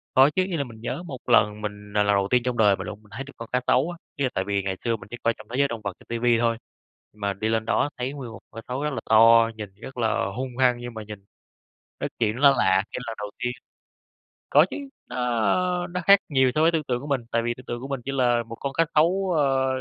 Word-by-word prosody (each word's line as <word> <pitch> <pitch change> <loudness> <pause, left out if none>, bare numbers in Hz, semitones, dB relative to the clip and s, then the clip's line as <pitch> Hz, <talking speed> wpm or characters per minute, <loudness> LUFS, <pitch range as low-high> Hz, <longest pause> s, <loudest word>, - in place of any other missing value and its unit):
Có 135 +2 +7
chứ, 185 - +3
như 185 -3 -3
là 140 - 0
mình 115 -4 -12
nhớ 145 +9 -4
một 135 -6 -6
lần 105 -3 +4
mình 105 -1 -7
là 105 0 +3
lần 105 0 +3
đầu 100 0 +1
tiên 125 -1 +3
trong 125 -1 -2
đời 105 -3 +5
mình - - -7
luôn. 105 +1 -7
Mình 105 - -21
thấy 125 +4 -5
được 140 - -13
con 115 - -8
cá 125 - +1
sấu 140 +7 +3
á, 175 - -9 0.2
ý 140 - -2
là - - +1
tại 95 - 0
vì 100 -1 0
ngày 95 -1 -3
xưa 115 -1 +1
mình 100 - -11
chỉ 120 - -7
coi 115 - +3
trong 110 - -13
thế 120 - -5
giới 140 0 +4
động 115 -3 -6
vật 100 -2 -3
trên - - -18
ti 115 - -3
vi 120 -1 +3
thôi, 115 -1 +1 0.6
mà 100 -1 -2
đi 110 +3 -2
lên 110 0 0
đó 145 - +1
thấy 125 +2 -2
nguyên 135 -5 -7
một 115 - -10
con - - -11
cá - - -45
xấu 130 +3 -3
rất 150 - 0
là 115 - -3
to, 115 +1 +7
nhìn 105 -1 -6
rất 125 +6 -11
là 115 0 +1
hung 125 -1 -4
hăng, 125 -2 +4
nhưng 120 -1 -7
mà 110 - -6
nhìn, 105 -2 -10 0.7
ơ, - - -2
chuyện 110 -2 +1
nó 140 +3 +6
lạ 95 0 +3
cái - - -4
lần 115 - -4
đầu 105 0 -6
tiên. 125 - 0 1.0
Có - - +6
chứ, - - -5 0.3
nó 125 - 0
nó 180 +1 -4
khác 200 0 +8
nhiều 130 -3 +3
so 155 - +3
với 165 +1 +5
tưởng 160 -2 0
tượng 125 0 -1
của 145 - -8
mình, 140 -3 0
tại 115 - +2
vì 120 +1 -1
tưởng 130 - -13
tượng 120 0 -5
của 135 - -6
mình 135 -3 -3
chỉ 135 - -2
là 120 -3 +2
một 115 0 -9
con 140 +3 -4
cá 165 - +3
sấu, 180 +4 +3
ờ, 135 -2 +2
120 Hz, 290 wpm, -25 LUFS, 110-135 Hz, 1.0 s, khác